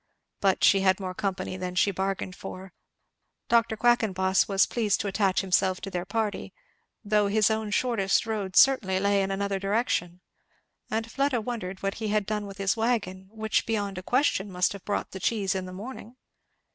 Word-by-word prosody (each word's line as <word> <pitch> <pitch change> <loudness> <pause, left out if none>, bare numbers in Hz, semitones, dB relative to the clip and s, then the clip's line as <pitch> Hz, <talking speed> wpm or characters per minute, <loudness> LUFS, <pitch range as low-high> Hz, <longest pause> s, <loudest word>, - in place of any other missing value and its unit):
But 195 -1 +1
she 195 - +6
had 190 0 +3
more 185 -1 -4
company 185 -1 -3
than 180 -1 -5
she 200 +3 +3
bargained 190 -1 -3
for. 185 0 -9 0.8
Dr. 230 -1 +3
Quackenboss 195 -6 +2
was 195 -1 +3
pleased 215 -4 0
to - - -3
attach 195 -1 +1
himself 185 -1 +1
to 195 - -6
their 180 -1 -3
party, 210 +1 -3 0.5
though 210 0 +2
his 215 +2 +3
own 220 -1 -1
shortest 205 -3 +1
road 205 -4 -3
certainly 215 -9 +5
lay 200 0 +2
in 195 - -1
another 195 0 -1
direction; 195 -4 -1 0.7
and 225 +1 -2
Fleda 275 -3 +1
wondered 210 -5 -5
what 195 0 0
he 220 - -1
had 210 -1 +1
done 210 -1 -3
with 195 0 -10
his 195 -1 +1
wagon, 210 -5 -1
which 220 -1 -1
beyond 205 -4 -2
a - - -7
question 210 -3 +1
must 180 +1 +1
have 200 -2 -11
brought 205 - -2
the 190 - -7
cheese 200 -1 0
in 190 -1 -3
the - - -8
morning. 230 +4 -9
200 Hz, 185 wpm, -27 LUFS, 190-220 Hz, 0.8 s, she